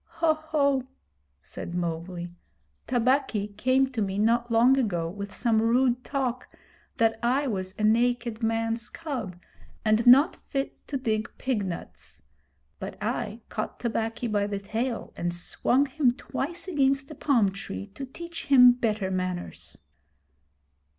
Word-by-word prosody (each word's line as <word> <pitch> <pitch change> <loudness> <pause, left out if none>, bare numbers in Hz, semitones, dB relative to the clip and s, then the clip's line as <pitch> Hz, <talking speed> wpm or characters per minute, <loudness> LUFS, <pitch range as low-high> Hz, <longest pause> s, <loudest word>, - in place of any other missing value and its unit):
'Ho! 330 -1 +3
ho!' 285 -4 0 0.6
said 175 - -7
Mowgli. 175 +1 -3 0.6
'Tabaqui 245 -4 +1
came 260 +5 +3
to 235 -4 -2
me 195 -1 -1
not 235 +3 +2
long 235 +3 +5
ago 175 -9 0
with 200 +3 -6
some 225 +2 +1
rude 245 +2 +2
talk 255 -3 -2 0.5
that 225 -1 +2
I 255 +5 +2
was 190 -6 -3
a 215 - -3
naked 235 +1 +2
man's 225 +1 -1
cub 255 - -5 0.5
and 215 +2 +3
not 270 +6 +7
fit 275 0 -5
to 280 - -2
dig 220 -3 -1
pig 255 -6 -1
nuts; 170 - -8 0.6
but - - -6
I - - -3
caught - - -4
Tabaqui 225 0 -2
by 205 -3 0
the 205 -1 -2
tail 225 +5 -3
and 175 0 -2
swung 250 +9 +1
him 270 -2 +2
twice 285 +6 -5
against 275 -3 +1
a - - -8
palm 240 -10 +2
tree 195 0 -6
to 270 +6 -6
teach 340 +5 -8
him 250 -3 +8
better 215 -5 -1
manners.' 185 -1 -4
235 Hz, 140 wpm, -27 LUFS, 205-265 Hz, 0.6 s, him